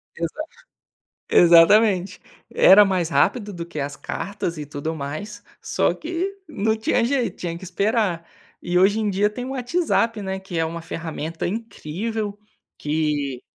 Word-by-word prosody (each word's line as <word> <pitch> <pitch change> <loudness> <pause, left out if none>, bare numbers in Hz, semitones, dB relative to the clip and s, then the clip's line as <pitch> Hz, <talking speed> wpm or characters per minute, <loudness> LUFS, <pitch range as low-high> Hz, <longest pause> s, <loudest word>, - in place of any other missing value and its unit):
Exa 170 - -4 0.9
exatamente, 185 +3 +5 0.3
era 205 +2 +7
mais 180 -4 0
rápido 205 - +1
do 170 -3 -6
que 170 -3 -7
as 140 0 -5
cartas 190 -4 -4
e 150 - -5
tudo 145 +3 -4
mais, 160 +9 -6 0.2
só - - +1
que 350 +4 -3
não 220 -7 0
tinha 225 +2 +1
jeito, 240 -5 0
tinha 170 -1 -5
que 185 - -10
esperar 195 -2 0 0.4
e 175 0 +1
hoje 200 +4 +4
em 210 - 0
dia 200 +2 +2
tem 230 +4 -6
o - - -6
WhatsApp, 245 -5 0
né, 190 0 -4
que 190 -3 -7
é 165 - +2
uma 165 +1 -5
ferramenta 165 -1 -5
incrível, 210 +1 -4 0.4
que 150 -4 -1
190 Hz, 150 wpm, -22 LUFS, 165-220 Hz, 0.9 s, era